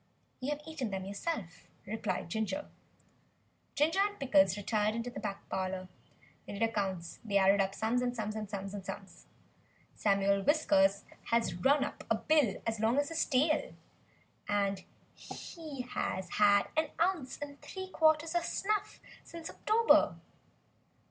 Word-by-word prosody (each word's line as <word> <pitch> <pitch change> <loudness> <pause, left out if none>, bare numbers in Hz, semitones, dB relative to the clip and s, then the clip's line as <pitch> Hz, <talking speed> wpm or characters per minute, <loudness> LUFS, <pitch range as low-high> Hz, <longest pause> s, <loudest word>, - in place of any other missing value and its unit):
"You 260 - -3
have 295 0 -2
eaten 300 -7 -4
them 190 -1 -4
yourself," 200 - -4 0.2
replied 220 -2 -2
Ginger. 220 - -2 1.1
Ginger 315 +5 +2
and 410 +1 +1
Pickles 195 -8 +4
retired 210 +1 0
into 230 +1 -3
the - - -6
back 205 -2 -5
parlour. 185 0 -3 0.6
They - - -6
did 200 +3 -1
accounts. 190 -6 -2
They 205 -3 +1
added 195 +1 +5
up 195 0 -1
sums 230 +3 +1
and 245 0 -1
sums, 215 -2 -3
and 215 -2 -4
sums. 195 -1 -7 0.7
"Samuel 200 -1 +2
Whiskers 200 -8 +3 0.2
has 230 -5 +1
run 270 +11 +3
up - - -5
a - - +4
bill 295 -10 +2
as 225 -1 -1
long 225 +4 +2
as 285 +1 +2
his 330 - +1
tail; 300 +4 +1 1.4
he 310 -6 -8
has 190 -6 -3
had 205 -1 +4
an 315 0 +1
ounce 335 -6 0
and 285 -1 -8
three 375 -1 -7
quarters 315 -1 +3
of 345 -1 +1
snuff 415 +4 -1 0.2
since 335 -1 -8
October." 455 +2 +4
225 Hz, 140 wpm, -32 LUFS, 200-300 Hz, 1.4 s, added